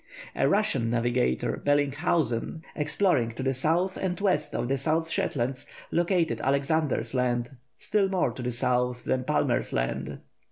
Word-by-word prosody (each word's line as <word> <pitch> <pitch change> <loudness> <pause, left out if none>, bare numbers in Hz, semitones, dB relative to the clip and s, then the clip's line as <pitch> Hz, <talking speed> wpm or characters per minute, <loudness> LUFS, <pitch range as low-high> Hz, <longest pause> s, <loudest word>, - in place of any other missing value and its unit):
A - - +2
Russian 195 - +1
navigator, 120 - 0
Bellinghausen, 145 0 +1
exploring 150 - +1
to 130 - -4
the 135 0 +1
south 165 +8 0
and 180 -2 -2
west 185 -7 0
of - - -1
the 135 +1 0
South 160 +3 0
Shetlands, 130 0 -1 0.2
located 175 -1 +1
Alexander's 140 -3 0
Land, 125 -1 0 0.3
still 200 -2 +1
more 185 -9 +1
to 125 - -8
the 125 0 -2
south 125 0 0
than 130 -1 -1
Palmer's 145 -4 0
Land. - - -2
140 Hz, 145 wpm, -27 LUFS, 125-165 Hz, 0.3 s, A